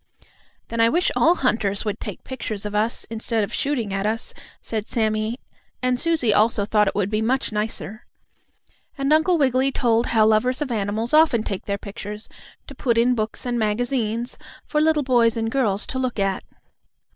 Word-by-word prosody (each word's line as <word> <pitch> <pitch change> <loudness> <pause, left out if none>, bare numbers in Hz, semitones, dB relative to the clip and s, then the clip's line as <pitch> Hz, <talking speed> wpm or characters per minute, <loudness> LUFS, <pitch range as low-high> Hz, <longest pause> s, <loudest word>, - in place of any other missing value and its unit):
"Then 230 - -4
I 230 0 +5
wish 345 +7 +1
all 335 +3 +4
hunters 215 - 0
would 210 0 -2
take - - -7
pictures 220 -5 -5
of 210 - -4
us, 215 +3 0
instead 225 0 -1
of 200 - -5
shooting 245 -8 -1
at 195 +1 -1
us," 225 +2 -1 0.3
said 220 -2 -4
Sammie, 220 +1 -1 0.4
and 250 -1 +1
Susie 320 -10 +2
also 210 0 +3
thought 210 0 +2
it - - -1
would 205 0 0
be 215 0 0
much 255 +3 0
nicer. 210 -1 -4 0.9
And 275 +2 +1
Uncle 315 +3 +3
Wiggily 265 -2 +2
told 235 -2 +1
how 220 -2 +4
lovers 220 +4 +2
of 295 -4 -3
animals 215 +2 -2
often 305 -8 +5
take 195 -3 -4
their 200 -1 -2
pictures, 205 +1 -7 0.4
to 280 - -10
put 245 -3 0
in 240 +2 +4
books 220 0 -3
and 240 -1 -1
magazines, 230 +1 -1 0.3
for 300 - 0
little 310 -1 +3
boys 235 -3 +3
and 225 0 -1
girls 215 -7 +1
to 260 - -3
look 255 -2 -2
at. 195 -1 0
230 Hz, 180 wpm, -22 LUFS, 210-255 Hz, 0.9 s, I